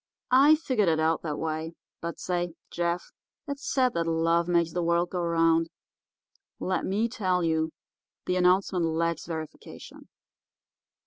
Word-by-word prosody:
I 280 +4 +7
figured 255 - +1
it 160 -1 +1
out 160 0 +1
that 150 -3 -3
way. 160 +1 -3 0.3
But 170 0 -5
say, 175 -2 -2 0.2
Jeff, 175 0 -2 0.4
it's 280 0 -4
said 255 -2 +2
that 165 -1 -1
love 165 +1 +2
makes 170 -2 +1
the 175 - -1
world 170 +1 +1
go 180 - -2
around. 165 -1 +2 0.9
Let 185 - -1
me 210 +4 +1
tell 185 -6 0
you, 160 -1 +1 0.6
the 180 - 0
announcement 180 0 +2
lacks 165 0 -1
verification. 160 -2 -8
170 Hz, 140 wpm, -27 LUFS, 165-185 Hz, 0.9 s, I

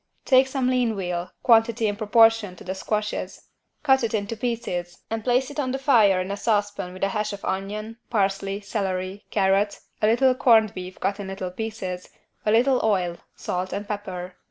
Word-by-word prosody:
Take 260 -1 +5
some 265 -1 -1
lean 245 -4 +1
veal 180 -2 -3
(quantity 230 -1 +4
in 205 -1 0
proportion 225 -2 +4
to - - -13
the 185 - -3
squashes) 210 +2 -3 0.3
cut 265 -3 +4
it 225 -1 0
into 210 +1 -2
pieces 215 -7 -3
and 225 -1 -2
place 255 +3 +1
it 285 - -6
on 260 -3 0
the - - 0
fire 225 -9 +4
in 185 +1 -3
a 200 - -3
saucepan 205 -3 -1
with 185 - -7
a 195 - +2
hash 210 +1 -2
of 200 - -7
onion, 210 +4 -4
parsley, 195 -2 0
celery, 195 -2 -3
carrot, 195 +1 +1 0.2
a 215 - +4
little 255 +4 +4
corned 225 -5 +4
beef 185 -1 -8
cut 200 +2 -1
in 200 - -5
little 190 -1 -5
pieces, 185 -3 -5 0.4
a - - +4
little 250 +4 +4
oil, 180 -5 +1 0.2
salt 180 +1 -3
and 205 +1 -4
pepper. 185 -4 -5
210 Hz, 185 wpm, -24 LUFS, 190-230 Hz, 0.4 s, Take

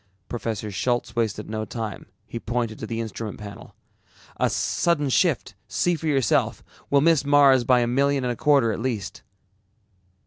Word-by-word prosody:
Professor 110 -3 -4
Schultz 120 +3 -1
wasted 110 -2 -1
no 110 0 -3
time, 110 -1 -6 0.2
he 115 +1 -6
pointed 115 -2 -3
to 110 - -5
the 115 0 -3
instrument 110 -1 -5
panel. 100 -1 -10 0.6
"A - - +2
sudden 150 -5 0
shift, 130 - +1
see 100 - +1
for 160 -1 -3
yourself. 135 -7 +1 0.3
We'll 140 -1 +4
miss 165 -2 +4
Mars 140 -3 +5
by 125 0 +4
a - - +2
million 140 +2 +1
and 125 -1 0
a - - -8
quarter 140 -4 +3
at - - -3
least." 115 -6 -3
120 Hz, 165 wpm, -24 LUFS, 110-140 Hz, 0.6 s, Mars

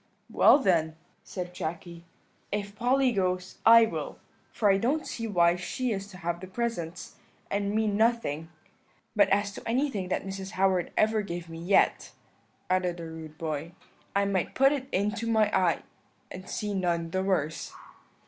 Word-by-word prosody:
"'Well - - +7
then,' 165 - +1 0.3
said 180 -2 -6
Jacky, 170 0 -6 0.5
'if 200 0 -3
Polly 255 +3 +2
goes, 185 -3 -2
I 230 0 +9
will; - - -5 0.3
for 210 -3 +3
I 195 - +3
don't 285 +8 0
see 230 -1 -4
why 175 -4 +3
she 230 +8 -2
is 200 -1 -3
to 195 -3 -12
have 170 -2 -3
the 185 - -8
presents, 185 -5 -4 0.3
and 200 +1 -1
me 220 0 +2
nothing 210 -7 +1 0.7
but 200 -2 +5
as 200 +1 +2
to - - -10
anything 235 -6 0
that - - -1
Mrs. 195 +1 -6
Howard 185 -2 +2
ever 215 0 +3
gave 175 -3 -6
me 165 0 -8
yet,' 180 +4 +2 0.5
added 180 -1 0
the 170 - -7
rude 160 -1 -9
boy, 160 0 -4 0.4
'I 200 0 +3
might 195 -2 -1
put 270 +1 +5
it 275 -3 -2
into 210 +4 -1
my 220 -2 +2
eye 180 -3 +2 0.5
and 185 0 -9
see 210 -1 -3
none 170 -3 -1
the 185 - 0
worse.' 165 -5 -1
195 Hz, 165 wpm, -28 LUFS, 175-215 Hz, 0.7 s, I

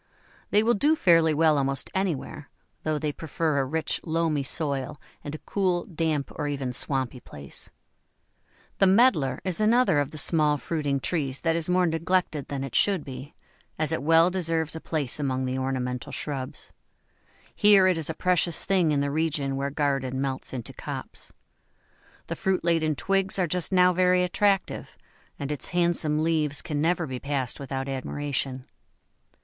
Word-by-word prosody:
They 210 +1 +4
will 235 +2 +3
do 295 +10 +3
fairly 165 - +4
well 155 -1 +3
almost 135 0 0
anywhere, 190 -7 -3 0.3
though 155 -1 -1
they 150 0 -2
prefer 155 -1 -2
a 135 - +1
rich, 160 +4 -1
loamy 160 -3 0
soil 140 0 -2 0.2
and 145 +1 -5
a - - -10
cool, 185 -3 0
damp, 160 -5 -2
or 150 - -3
even 135 -3 -3
swampy 130 -1 -1
place. 70 - -10 1.1
The 195 - +5
Medlar 185 - +3
is 185 +1 -2
another 225 -7 +4
of 145 -1 -1
the 155 - -9
small 150 -1 +3
fruiting 145 -2 -2
trees 135 -6 -2
that 165 -1 +1
is 165 0 -1
more 180 0 +3
neglected 165 -3 0
than 140 -1 -4
it 135 -4 -6
should 195 - +2
be, 130 +2 -9 0.4
as 155 -1 +1
it - - -1
well 165 +4 +4
deserves 165 -3 -1
a 160 - -6
place 150 -4 -2
among 130 -2 -1
ornamental 130 0 -3
shrubs. 135 -1 -5 0.8
Here 205 -2 +6
it 185 -1 +4
is 165 -2 -2
a 160 - -3
precious 175 -3 +1
thing 185 -5 +2
in 145 -1 +1
the 140 0 -1
region 145 -3 -1
where 140 +1 -2
garden 135 -3 -1
melts 135 -1 -3
into 125 -3 -6
copse. - - -7 0.9
The - - -4
fruit 190 -1 -1
laden 165 -3 +1
twigs 195 +7 0
are 185 - +2
just 180 +2 -2
now 180 -1 +5
very 180 0 +3
attractive, 195 +1 0 0.4
and 140 +1 -4
its 150 - 0
handsome 170 -3 +1
leaves 155 -3 +1
can 150 -3 -2
never 170 +1 +1
be 130 -3 -5
passed 135 -3 -3
without 135 -1 -4
admiration. 135 -1 -3
155 Hz, 165 wpm, -26 LUFS, 140-175 Hz, 1.1 s, Here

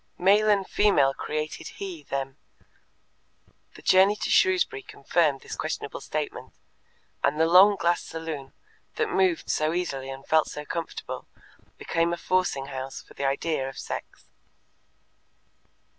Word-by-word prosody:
"Male 205 +4 +4
and 200 -2 +3
female 145 -10 +3
created 155 +2 -4
He 185 -5 -6
them"; 135 -1 -4 1.4
the - - -14
journey 190 +2 +5
to 210 - -3
Shrewsbury 375 +2 +3
confirmed 150 - 0
this - - -7
questionable - - -4
statement, - - -4 0.7
and 150 +2 +1
the 160 - +5
long 190 +5 +7
glass 175 -2 +1
saloon, 160 -4 -6 0.4
that - - -1
moved 185 -3 +2
so 155 +1 +1
easily 140 -7 -3
and 135 0 -8
felt 160 -1 +3
so 150 0 -7
comfortable, 165 +2 -5 0.5
became 165 +1 0
a - - -2
forcing 180 -7 0
house 135 -1 -6
for - - -17
the 140 - -3
idea 135 0 0
of 135 - -11
sex. - - -7
165 Hz, 135 wpm, -26 LUFS, 140-185 Hz, 1.4 s, long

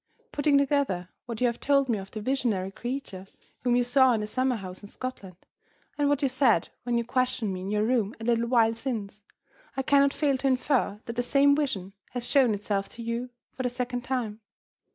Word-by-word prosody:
"Putting 290 -1 +3
together 275 -11 +1 0.2
what 235 -1 -5
you - - +4
have 235 -1 0
told 275 -1 +3
me 225 -4 0
of 195 0 -9
the 215 - -6
visionary 215 -6 0
creature 235 -5 -5 0.3
whom 245 -1 +1
you 245 - +3
saw 255 +1 +4
in 220 - 0
the - - -2
summer 255 +4 0
house 185 -3 -7
in 205 - -11
Scotland, 210 -9 -7 0.6
and 290 -1 +1
what 290 0 +1
you - - +4
said 255 - +2
when 240 -1 0
you 235 - 0
questioned 250 -4 0
me 185 - -5
in 190 - -5
your 210 0 +1
room 225 -2 +1
a - - -8
little 235 0 +1
while 230 -2 +4
since, 225 -4 -5 0.6
I 270 - 0
cannot 280 0 +4
fail 280 -3 +1
to 275 - 0
infer 255 -5 +1
that 235 - -5
the - - +3
same 280 +3 +4
vision 205 -11 -2 0.2
has 245 -1 -3
shown 255 -7 +4
itself 200 -1 -2
to 230 - -9
you, 235 +2 -3 0.2
for - - -5
the 250 - 0
second 245 0 -3
time. 235 -4 -3
245 Hz, 215 wpm, -27 LUFS, 210-265 Hz, 0.6 s, you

